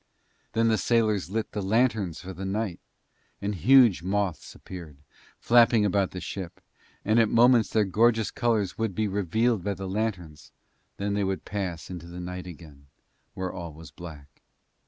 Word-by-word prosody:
Then 115 0 +3
the 110 -2 +2
sailors 110 -5 +1
lit 110 +2 -3
the 105 - -3
lanterns 105 -4 +1
for 95 0 -7
the 95 +2 -7
night, 95 -1 -2 0.6
and 100 +1 -2
huge 115 - +5
moths 95 -1 -2
appeared, 85 -6 -10 0.4
flapping 115 -2 +4
about 100 -1 +1
the 90 - -7
ship, 95 -1 -6 0.5
and 110 +3 +3
at 110 -2 +4
moments 120 0 +5
their 110 -2 +2
gorgeous 110 +3 +2
colours 110 -6 0
would 110 -5 -1
be 110 -1 0
revealed 105 +2 0
by 100 +1 -1
the 95 +1 -6
lanterns, 95 -7 -4 0.5
then 100 +1 -2
they 100 0 0
would 95 -4 -2
pass 95 -5 -4
into 85 -2 -7
the 85 +1 -8
night 90 +1 -6
again, 75 -5 -12 0.5
where 95 -1 -4
all 85 -3 -7
was 80 -1 -12
black. 75 -5 -12
100 Hz, 165 wpm, -27 LUFS, 90-110 Hz, 0.6 s, huge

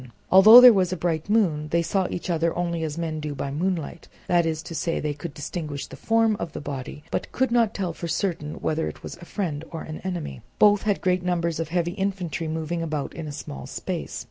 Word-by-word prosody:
Although 215 +6 +10
there 250 -1 +10
was 185 -3 +1
a 185 - -2
bright 165 +1 -2
moon 170 -9 +2
they 170 +2 +1
saw 190 +2 0
each 180 - -4
other 165 0 0
only 170 -1 -1
as 155 0 -4
men 160 -2 -3
do 150 -1 -4
by 140 - -4
moonlight, 170 +1 -3 0.2
that 175 -2 +2
is 160 0 -2
to 165 - -8
say, 165 +1 -1
they 150 -1 -2
could 145 +3 -7
distinguish 150 -1 -5
the - - -11
form 225 -1 +2
of 170 -6 -5
the - - -5
body, 145 0 -6
but - - -3
could 260 -1 0
not 230 -3 +2
tell 185 -4 -2
for 170 - -6
certain 165 -3 -2
whether 160 +1 -1
it - - -8
was - - -7
a 175 - -12
friend 165 -7 -3
or 165 - -6
an 155 0 -7
enemy. 175 - -4 0.2
Both 205 -1 +5
had 205 - +1
great 180 0 +1
numbers 170 -2 -1
of 165 -2 -3
heavy 175 0 0
infantry 185 -4 -3
moving 160 +2 -3
about 155 -3 -3
in 165 -2 -6
a - - -5
small 70 - -7
space. - - -5
170 Hz, 230 wpm, -25 LUFS, 155-185 Hz, 0.2 s, Although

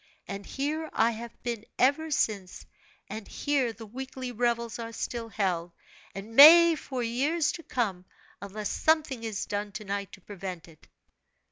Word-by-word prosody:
And 200 0 -6
here 305 +3 -3
I 230 +1 +3
have 230 +1 -9
been 235 -3 -3
ever 285 +5 +2
since, 200 -10 -1 0.4
and 215 +1 -7
here 275 -5 0
the 225 +1 -11
weekly 260 +2 -6
revels 235 0 -1
are 230 0 -5
still 230 0 -4
held, 180 -5 -1 0.4
and 210 +3 -8
may 335 +4 +10
for 260 -5 -4
years 285 +8 +1
to 335 - -8
come, 200 - -2 0.4
unless 205 +1 -5
something 305 -6 +1
is 220 -3 -3
done 205 0 -3
to 215 - -6
night 200 0 -3
to 195 - -12
prevent 185 -3 -7
it. 160 -2 -19
230 Hz, 155 wpm, -28 LUFS, 200-265 Hz, 0.4 s, may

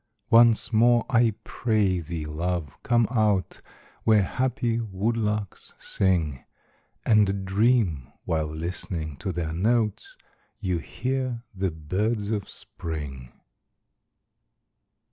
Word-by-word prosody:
Once 115 0 +6
more, 120 +1 +4
I 115 -3 +4
pray 105 -6 +1
thee, 80 -1 -5
love, 80 -1 -3
come 120 -1 +3
out, 105 -6 +1 0.4
Where 110 -2 +5
happy 125 +1 -1
woodlarks 105 -1 -2
sing, 80 -9 0 0.6
And 100 -3 +3
dream, 95 - +2
while 80 -2 0
listening 80 -1 -4
to 95 - -3
their 80 -2 -3
notes, 110 +4 0 0.4
You 90 -2 -1
hear 125 - -3
the 95 0 -1
birds 100 +7 -2
of 105 -3 -2
Spring. 75 -8 -7
100 Hz, 100 wpm, -26 LUFS, 85-115 Hz, 0.6 s, Once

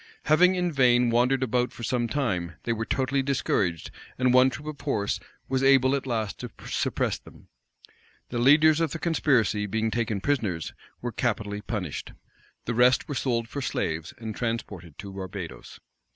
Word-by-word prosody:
Having 180 +4 +5
in 180 -1 0
vain 125 -4 +4
wandered 125 +3 +2
about 125 -1 0
for 120 - -10
some 120 +1 0
time, 95 - -1
they 115 - 0
were 110 0 -3
totally 135 +1 +1
discouraged; 100 - -1 0.3
and 125 -1 +3
one 130 +1 +6
troop 145 +3 -8
of 155 -2 -6
horse 105 -8 -1 0.3
was 130 0 0
able 135 -1 +5
at 135 -1 -4
last 110 -4 -2
to - - -6 0.2
suppress - - -1
them. - - -17 0.8
The 120 - -2
leaders 150 +5 +6
of 165 -3 0
the - - -3
conspiracy, 130 -11 +1
being 110 +2 -1
taken 115 -3 -1
prisoners, 105 - -1 0.3
were 120 - -3
capitally 105 -4 -2
punished. 100 - -5 0.5
The 120 - -1
rest 125 +2 +4
were 145 - -3
sold 120 -3 -1
for 140 - -5
slaves, 80 - -2
and 110 -2 -6
transported 100 - -4
to 100 -1 -8
Barbadoes. 95 -2 -7
120 Hz, 165 wpm, -26 LUFS, 105-135 Hz, 0.8 s, one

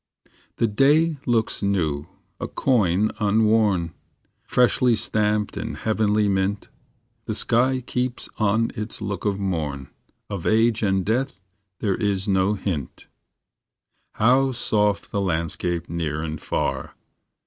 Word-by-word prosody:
The - - +1
day 145 +8 +3
looks 115 -2 +1
new, 80 -8 0 0.3
a - - -3
coin 105 -5 +1
unworn, 105 -5 +2 0.5
Freshly 125 -1 +3
stamped 105 -1 0
in - - -4
heavenly 110 -1 +1
mint:. 100 +1 -1 0.6
The - - -2
sky 130 +2 +2
keeps 125 0 -3
on 110 +2 +2
its 105 +1 -5
look 105 -2 -4
of 100 -2 +1
morn; 80 -9 -3 0.4
Of 100 -5 -4
age 115 0 +3
and 95 -3 +1
death 120 0 -1 0.4
there 100 -3 +1
is 100 -1 -1
no 95 +1 +2
hint. 85 -10 -5 1.0
How 130 +4 +3
soft 105 -3 0
the 100 - -1
landscape 85 -1 -1
near 80 -2 -3
and 80 -2 -5
far! - - -2
105 Hz, 120 wpm, -23 LUFS, 95-115 Hz, 1.0 s, day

